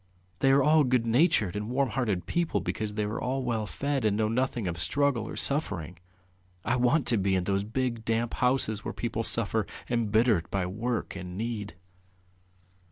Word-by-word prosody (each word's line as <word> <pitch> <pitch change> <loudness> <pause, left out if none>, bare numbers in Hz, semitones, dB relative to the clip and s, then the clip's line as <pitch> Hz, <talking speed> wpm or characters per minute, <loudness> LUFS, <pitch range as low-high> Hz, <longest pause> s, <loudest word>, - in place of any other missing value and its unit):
They 135 - +3
are 135 0 +5
all 155 +1 +5
good 125 -3 +2
natured 115 - +3
and 105 +2 -3
warm 135 +1 +1
hearted 105 -10 -1
because 110 - -1
they 105 - 0
are 105 +3 -3
all 130 +1 -1
well 115 -4 -1
fed 140 +1 -2
and 105 -1 +2
know 110 -1 +1
nothing 120 -1 -1
of 85 0 -3
struggle 130 - +1
or - - -6
suffering,... 90 - -1 0.7
I 120 - +2
want 125 +5 +2
to 115 - +2
be 95 -1 +1
in 90 - +1
those 100 +1 0
big 115 +1 -2
damp 115 +1 -1
houses 125 -5 +1
where - - -5
people 115 -1 -2
suffer, 110 -1 0 0.2
embittered 110 -4 +2
by 95 -2 -1
work 110 +5 -3
and 90 -1 -7
need. 110 -2 -4
115 Hz, 175 wpm, -28 LUFS, 105-125 Hz, 0.7 s, are